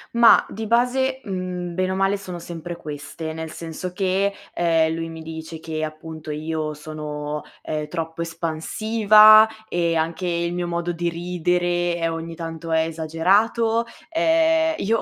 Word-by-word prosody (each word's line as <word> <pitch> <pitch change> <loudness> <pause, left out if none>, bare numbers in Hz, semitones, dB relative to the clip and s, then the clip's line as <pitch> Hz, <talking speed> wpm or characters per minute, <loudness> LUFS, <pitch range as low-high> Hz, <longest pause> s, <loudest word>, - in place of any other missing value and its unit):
Ma 235 0 +7
di 220 +1 -6
base, 260 +3 +2
mhmm, 180 -3 -4
bene 185 +1 0
o - - -1
male 195 +1 +2
sono 185 -3 -7
sempre 170 0 -7
queste, 160 +1 -6
nel 160 0 -5
senso 170 +3 -6
che, 195 +1 +1 0.2
ehm, 165 -2 +2
lui 165 0 -4
mi 160 0 -8
dice 160 0 -7
che 155 -1 -4
appunto 155 0 -7
io 155 0 -3
sono, 150 0 -5 0.2
ehm, 150 -1 -3
troppo 165 +1 -4
espansiva 215 +7 +5 0.2
e 170 -3 0
anche 165 +3 -1
il 170 0 -1
mio 175 0 -2
modo 170 0 -2
di 175 0 -1
ridere 175 0 0
è 165 -1 -1
ogni 165 0 -5
tanto 165 0 -6
è 160 0 +3
esagerato. 195 +9 +1 0.3
Ehm, 325 0 +3
io 225 +3 +1
170 Hz, 150 wpm, -23 LUFS, 160-195 Hz, 0.3 s, Ma